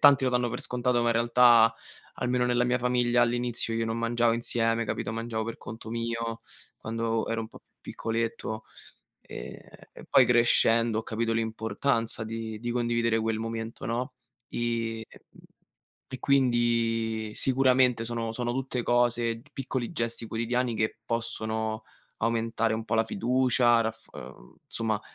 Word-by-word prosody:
tanti 140 -2 +7
lo 130 - +2
danno 125 -1 +1
per 125 - -4
scontato, 125 -1 0
ma, 120 - +2
in - - +3
realtà, 115 -1 +5 0.4
almeno 125 0 0
nella 125 0 +2
mia 125 0 +1
famiglia, 120 0 +2
all'inizio, 120 -1 0
io 115 0 0
non 115 +1 -2
mangiavo 115 0 +2
insieme, 115 0 +1
capito, 110 - -3
mangiavo 115 -1 -3
per 115 0 -5
conto 110 0 -9
mio, 115 0 -3 0.4
quando 115 0 -2
ero 115 0 -1
un 110 - -8
po' - - -14 0.2
piccoletto. 115 -1 -3 0.6
Ehm, - - -8 0.4
e - - -12
poi, 135 -2 +6
crescendo, 115 -1 +3
ho - - -6
capito 115 0 -1
l'importanza 115 +1 -1
di 110 -1 -5
di 120 +1 -3
condividere 120 -1 +1
quel 110 0 -1
momento, 115 0 -5
no, 120 +2 -2 0.4
i 115 -1 -2
mhmm, - - -19 0.7
e 130 - -5
quindi 115 -4 +1
sicuramente 130 -3 +3
sono 115 -1 -2
sono 120 0 -2
tutte 130 -2 -2
cose, 120 -1 +1
t 145 - -17
piccoli 130 -1 -3
gesti 115 -4 -3
quotidiani 120 +2 -1
che 110 +1 -1
possono 110 -1 -2 0.3
aumentare 115 0 0
un 110 - -4
po' 115 - -1
la 110 0 +3
fiducia, 120 +1 +3
raffor 110 0 -5
ehm, 60 -1 -13
insomma 110 -2 -1
115 Hz, 150 wpm, -28 LUFS, 115-120 Hz, 0.7 s, tanti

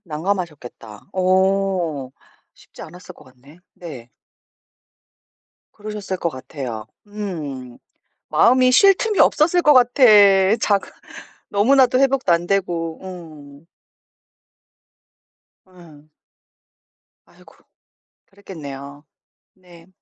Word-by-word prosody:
난감하셨겠다. 150 - -6
어 185 -6 0 0.4
쉽지 - - -16
않았을 180 0 -13
것 - - -19
같네? 130 +5 -20 0.2
네. 140 -9 -11 1.6
그러셨을 210 -2 -7
것 170 - -2
같아요. 130 -5 -8 0.2
음. 150 - -7 0.5
마음이 255 +1 +3
쉴 390 +9 +6
틈이 430 +1 -2
없었을 340 +4 +3
것 295 - +5
같아. 250 +1 +3 0.6
자 200 -2 +2 0.7
너무나도 255 +5 +3
회복도 270 -8 +1
안되고. 170 -2 -1
응. 155 -5 -12 2.0
음. 165 -5 -19 1.1
아이고. - - -22 0.7
그랬겠네요. 145 -7 -11 0.5
네. 175 -2 -19
180 Hz, 175 characters per minute, -19 LUFS, 145-205 Hz, 2.0 s, 쉴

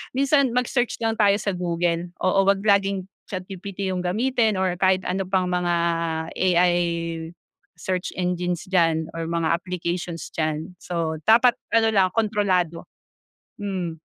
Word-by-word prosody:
Minsan 275 -1 +3
mag-search 250 0 0
na 225 0 +1
lang - - -22
tayo 200 0 +4
sa 200 - -1
Google, 175 0 -1
oo, 185 +1 +3
huwag 195 0 +4
laging 195 -1 +2 0.2
ChatGPT 190 +1 -5
yung 185 - -2
gamitin 225 +3 +1
or 185 -2 +1
kahit 190 0 +3
ano 190 +1 -1
pang 185 -1 +1
mga 175 -1 +1 0.6
AI 180 -1 +3 1.0
search 185 -1 -3
engines 180 -1 -1
diyan 165 -3 +2
or 165 -1 -3
mga 165 -1 0
applications 175 -1 -4
diyan. 155 +3 -2
So 165 -2 -3
dapat 240 +2 +6 0.2
ano 225 -1 +4
lang, 195 -3 +4
kontrolado, 195 -6 0 0.7
mm. 180 -5 -3
185 Hz, 135 wpm, -23 LUFS, 175-200 Hz, 1.0 s, dapat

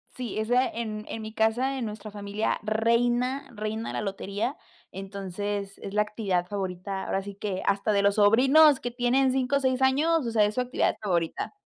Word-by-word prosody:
sí, 245 -4 -5
esa 245 +4 +2
en 215 -2 -5
en 225 - -5
mi 220 0 -7
casa, 240 +5 +1
en 245 - -2
nuestra 215 0 -7
familia 205 +1 -2
reina 240 +5 +1
reina 215 +1 -4
la - - -2
lotería. 200 +5 -3 0.3
Entonces, 195 +1 -5
es 195 - -7
la 210 - +3
actividad 200 -4 -1
favorita, 190 0 -4
ahora 195 - -1
sí 200 0 -8
que, 195 -2 -3
hasta 200 +2 +1
de 200 -1 +3
los 200 0 +3
sobrinos 265 +8 +6
que 245 - -4
tienen 250 +2 +2
5 265 +1 0
o - - 0
6 260 -1 0
años, 295 +3 +3
o 230 - -2
sea, 220 -2 +4
es 210 - -2
su 250 - +1
actividad 250 0 0
favorita. 175 - -1
215 Hz, 190 wpm, -27 LUFS, 200-250 Hz, 0.3 s, sobrinos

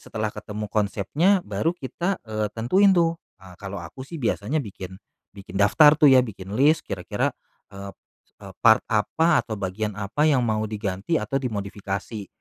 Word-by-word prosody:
setelah 110 -1 -4
ketemu 105 0 -6
konsepnya 110 - +1
baru 105 +10 0
kita, 175 +6 -3
eee, 110 -1 -2
tentuin 185 - +3
tuh, 170 -1 +2 0.2
ha 95 -1 -14
kalau 100 -1 -6
aku 85 +10 -9
sih 165 +2 -8
biasanya 120 +4 -1
bikin 95 -5 -8 0.4
bikin 100 -2 -12
daftar 145 +9 +6
tuh 150 -2 +7
ya, 130 - +7
bikin 95 -2 -9
list, 155 +4 +4
kira-kira, 95 -3 -2 0.4
ep 100 0 -9 0.5
eee, - - -10
part - - +6
apa 155 +9 +2
atau 110 - -5
bagian 100 +2 -3
apa 105 +9 -1
yang 135 -4 +3
mau 110 -2 0
diganti 105 - -2
atau 135 - -1
dimodifikasi. 100 -2 -5
110 Hz, 160 wpm, -24 LUFS, 100-145 Hz, 0.5 s, tuh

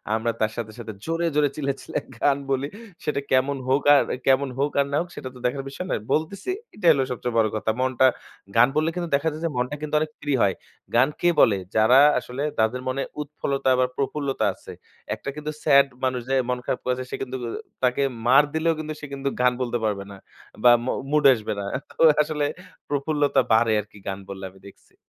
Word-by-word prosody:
আমরা 115 +1 0
তার 110 - +2
সাথে, 115 -2 -5
সাথে 115 -2 -6
জোরে, 165 +1 -1
জোরে 145 -1 +3
চিল্লাইয়া, 140 -2 -2
চিল্লাইয়া - - -5
গান 140 -1 +3
বলি। 135 +1 0 0.4
সেটা 145 -2 -1
কেমন 135 +2 +2
হোক 135 +2 +3
আর - - +5 0.2
কেমন 135 0 +3
হোক 145 +1 +1
আর 140 - +4
না 145 - +1
হোক 175 - -6
সেটা 130 - -6
তো - - -11
দেখার 135 +2 -1
বিষয় 180 +7 -6
নয়। - - -1
বলতেছি 175 - -2 0.3
এটাই 175 -6 +5
হলো 135 -2 +1
সবচেয়ে 125 -1 -3
বড় 110 -1 +4
কথা। 110 +1 0
মনটা, 130 0 +3 0.5
গান 120 +2 +7
বললে 155 +1 +2
কিন্তু 175 -2 -3
দেখা 145 +3 0
যায় 155 - -8
যে, - - +1
মনটা 125 +3 -1
কিন্তু 150 0 -6
অনেক 155 0 -2
ফ্রি 145 -1 -1
হয়। 95 -2 +3 0.4
গান 125 +3 +5
কে 175 - +4
বলে? 105 -3 +5 0.2
যারা 110 +5 +6 0.2
আসলে 125 +3 -5 0.2
তাদের 115 +3 +1
মনে 130 +1 -1 0.2
উৎফলতা 140 -2 -1
বা 130 - +4
প্রফুল্লতা 140 0 -1
আছে। - - -12 0.4
একটা - - -7
কিন্তু 150 0 -4
স্যাড 140 -2 +6 0.2
মানুষ 130 -1 0
যে 135 - +2
মন 125 - +1
খারাপ - - -1
করেছে, 130 0 -1
সে - - -2
কিন্তু 130 0 -4
অ - - -4 0.3
তাকে 125 +2 +2 0.2
মার 135 +4 +7
দিলেও 160 +1 +2
কিন্তু 155 0 -4
সে 150 - -6
কিন্তু 140 0 -2
গান 125 0 +4
বলতে 120 -1 -1
পারবে 100 -2 -1
না। 100 - -10 0.5
বা 120 - +8
মু - - 0 0.2
মুড 150 -1 +3
আসবে 110 -4 -3
না। 100 - -4 0.3
তো - - -7 0.2
আসলে 150 -1 -2 0.4
প্রফুল্লতা 145 -1 +1
বাড়ে 110 0 +4
আরকি 105 0 -9
গান 95 0 -3
বললে 95 -1 -6
আমি 95 0 -20
দেখছি। - - -24
135 Hz, 210 wpm, -24 LUFS, 120-150 Hz, 0.5 s, বা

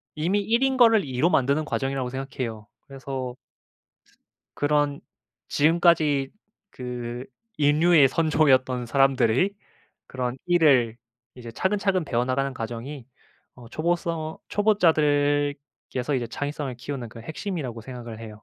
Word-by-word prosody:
이미 175 +7 0
1 230 +5 +1
인 265 -1 +1
거를 225 -4 +6
2 130 -3 -5
로 170 - +4
만드는 140 +1 +2
과정이라고 135 -3 -2
생각해요. 125 -5 -5
그래서 130 -2 -6 1.2
그런 145 -1 +1 0.5
지금까지 155 -3 +3 0.4
그 125 0 -6 0.3
인류의 150 +1 +5
선조였던 130 -5 +2
사람들의 135 - +2 0.5
그런 125 -1 -3
1 175 -1 +2
을 120 -6 +4 0.4
이제 120 -2 -9
차근차근 190 - 0
배워나가는 130 +2 0
과정이 120 +3 -6 0.5
어 120 -2 -13
초보써 165 +1 -2
초보자들께서 145 - +1
이제 120 -2 -2
창의성을 145 +1 -4
키우는 125 -1 -6
그 115 - -11
핵심이라고 150 - -5
생각을 120 -2 -8
해요. 110 -2 -10
140 Hz, 280 characters per minute, -25 LUFS, 125-160 Hz, 1.2 s, 거를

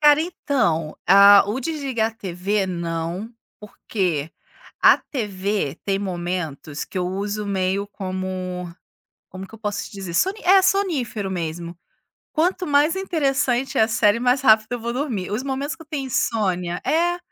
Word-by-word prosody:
Cara, 295 0 +6
então, 225 - -1
a 200 +1 +8
o 215 +5 -1
desligar 265 -6 -1
a - - -23
TV, 195 0 -2
não, 170 +3 -4 0.3
porque 180 -7 -3 0.5
a - - +7
TV 200 - -3
tem 195 -1 0
momentos 175 -6 -4
que 190 - -6
eu 180 - -1
uso 205 +2 -3
meio 195 0 -1
como 185 -3 -5 0.6
como 185 +1 -8
que - - -21
eu 220 - -11
posso 205 -2 -3
te - - -11
dizer? 195 -4 -7
Soni 385 - +1
é 385 +2 +6
sonífero 305 - 0
mesmo. 170 -1 -4 0.6
Quanto 360 +3 0
mais 295 +2 +3
interessante 275 -8 0
é - - +5
a 220 - +3
série, 225 0 +3
mais 250 +2 +2
rápido 220 -4 +5
eu 245 - -2
vou 235 +1 -3
dormir. 240 -9 -3
Os 215 +5 -2
momentos 275 +2 -3
que 325 - -13
eu - - -20
tenho 285 -4 -3
insônia 180 -8 -1
É. 345 +2 +2
210 Hz, 160 wpm, -22 LUFS, 185-270 Hz, 0.6 s, a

